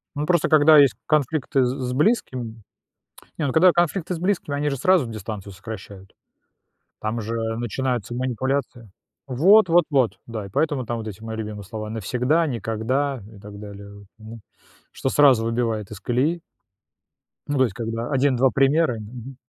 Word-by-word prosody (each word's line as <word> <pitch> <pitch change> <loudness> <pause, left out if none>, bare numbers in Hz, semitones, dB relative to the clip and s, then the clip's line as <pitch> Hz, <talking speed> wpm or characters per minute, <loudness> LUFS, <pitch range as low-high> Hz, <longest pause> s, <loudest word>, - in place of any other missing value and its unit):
Ну, 145 +1 -2
просто, 175 -1 +2
когда 155 0 +6
есть 140 -2 +6
конфликты 145 -2 +1
с 125 0 -3
с 125 - -2
близким. 130 - -1 0.7
Не, 160 - -1
ну, 130 - -2
когда 180 +3 +6
конфликты 175 +1 0
с - - -7
близкими, 175 -6 -1
они 145 +1 0
же 140 - -3
сразу 180 +1 +3
дистанцию 105 -2 -7
сокращают. 100 -1 -10 0.9
Там 110 +2 -2
же 115 +1 -4 0.2
начинаются 120 -1 -2
манипуляции. 125 -2 -3 0.4
Вот 180 - +5
вот 170 0 +5
вот, 130 -6 +1
да, 110 -3 -6
и - - -9
поэтому 145 - 0
там 120 -1 -3
вот 110 - -6
эти 100 -2 -9
мои 110 0 -6
любимые 105 -2 -6
слова: 110 +1 -6
навсегда, 125 - 0
никогда 130 +2 -2
и - - -13
так 100 0 -11
далее, 100 -1 -10
вот, 100 -1 -14
м. 110 +1 -10 0.5
Что - - -2
сразу 135 -5 +5
выбивает 115 -3 -2
из 105 -3 -9
колеи. 140 +8 0 1.1
Ну, 145 - -1
то 130 - +5
есть, 115 -7 -1
когда 115 0 -4
1-2 135 -1 +3
примера, 135 0 +2
мгм 120 +4 -9
125 Hz, 165 wpm, -23 LUFS, 110-145 Hz, 1.1 s, когда